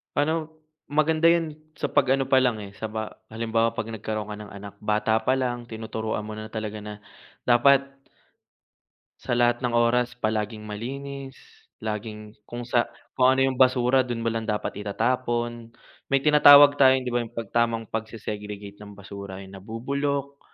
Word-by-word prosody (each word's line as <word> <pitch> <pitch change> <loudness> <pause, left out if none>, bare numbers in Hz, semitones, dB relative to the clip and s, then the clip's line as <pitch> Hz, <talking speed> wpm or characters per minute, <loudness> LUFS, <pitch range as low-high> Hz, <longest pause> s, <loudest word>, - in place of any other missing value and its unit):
Pa'no 155 +2 +1 0.4
maganda 155 +2 +2
'yon, 165 -3 +2 0.2
sa - - -3
pag 135 - +3
ano 135 - 0
pa 130 - +7
lang 125 -4 +2
eh, 100 - -9
sa 110 +2 -6
ba 110 0 -5 0.2
halimbawa 115 0 0
'pag 115 -1 -4
nagkaroon 110 -1 -4
ka 105 - -6
ng 105 -2 -10
anak, 100 0 -9
bata 105 +1 +1
pa 130 +4 +1
lang 120 -2 -2
tinuturuan 110 -1 -4
mo 110 - -7
na 110 - -6
talaga 110 -1 -4
na, 105 0 -6 0.5
dapat 135 +3 +5 1.4
...sa 120 - -2
lahat 120 0 +3
ng 125 -2 -1
oras, 120 +1 +2
palaging 110 -1 -2
malinis, 135 +6 -6 0.5
laging 105 0 -5 0.2
kung 120 0 -6
sa 120 0 +1 0.3
kung 130 +1 +6
ano 135 - +3
'yong 135 -1 0
basura 130 0 +4
do'n 120 -3 -1
mo 115 - +1
lang 115 -1 -3
dapat 105 -1 -2
itatapon, 120 +2 -2 0.3
may 140 0 +1
tinatawag 145 -1 +8
tayong, 130 -1 +6
'di 125 - -3
ba, 120 - +1
'yong 120 0 -6
pag 115 -3 -5
tamang 115 -1 +1
pagse-segregate 105 -2 -6
ng 105 -1 -11
basura, 100 -1 -9
'yong 95 0 -11
nabubulok 140 +6 -3
115 Hz, 165 wpm, -25 LUFS, 110-130 Hz, 1.4 s, tinatawag